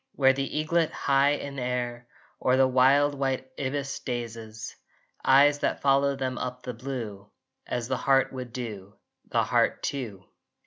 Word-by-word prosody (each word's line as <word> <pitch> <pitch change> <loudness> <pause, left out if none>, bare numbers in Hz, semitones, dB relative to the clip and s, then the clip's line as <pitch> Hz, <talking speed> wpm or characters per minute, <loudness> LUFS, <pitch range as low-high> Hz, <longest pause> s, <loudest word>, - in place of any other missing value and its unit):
Where 135 -1 +4
the 135 +2 -3
eaglet, 160 +1 +1
high 140 +1 +3
in 140 -1 -5
air, 120 -1 -3 0.3
Or 130 0 +2
the 135 0 +5
wild 135 +3 +4
white 135 -1 -2
ibis, 135 0 -2
dazes 115 -3 -6 0.5
Eyes 145 +2 +5
that - - -1
follow 140 0 +3
them 130 -2 -3
up 125 0 -5
the 125 - -5
blue, 115 -5 -6 0.4
As 120 -2 -2
the 130 0 -1
heart 135 0 +2
would 125 -2 -6
do, 105 -6 -7 0.3
the - - +2
heart - - +1
too! 115 -9 -4
130 Hz, 150 wpm, -27 LUFS, 120-140 Hz, 0.5 s, the